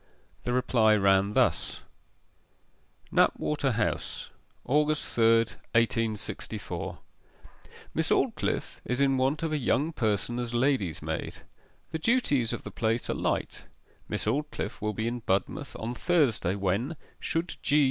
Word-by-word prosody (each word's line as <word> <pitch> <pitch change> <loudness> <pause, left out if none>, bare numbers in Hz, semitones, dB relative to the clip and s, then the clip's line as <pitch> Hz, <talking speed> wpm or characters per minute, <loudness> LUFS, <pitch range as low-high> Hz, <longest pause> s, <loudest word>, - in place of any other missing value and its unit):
The 125 - 0
reply 120 -3 +4
ran 100 0 +3
thus: - - +1 1.3
KNAPWATER 145 -4 +2
HOUSE, 105 -1 -2 0.3
August 150 +2 +2
3, 115 0 +4 0.4
1864. 115 -3 -1 1.0
'Miss - - 0
Aldclyffe - - 0
is 125 +1 -2
in 135 -1 +3
want 135 +5 +1
of 160 -1 -1
a 150 - +1
young 145 +5 +1
person 115 -1 0
as 120 -1 -3
lady's 120 - +1
maid. - - -3 0.6
The 160 - -2
duties 150 - +2
of - - -4
the - - -7
place 115 +1 0
are - - +1
light. - - -2 0.4
Miss - - -1
Aldclyffe 145 +8 -2
will 105 0 -1
be 110 +2 -2
in 120 +1 -2
Budmouth 100 -3 -1
on 115 +2 -4
Thursday, 125 - +2
when 100 - 0 0.2
(should 165 +2 -2
G. 150 - +3
120 Hz, 130 wpm, -28 LUFS, 110-145 Hz, 1.3 s, reply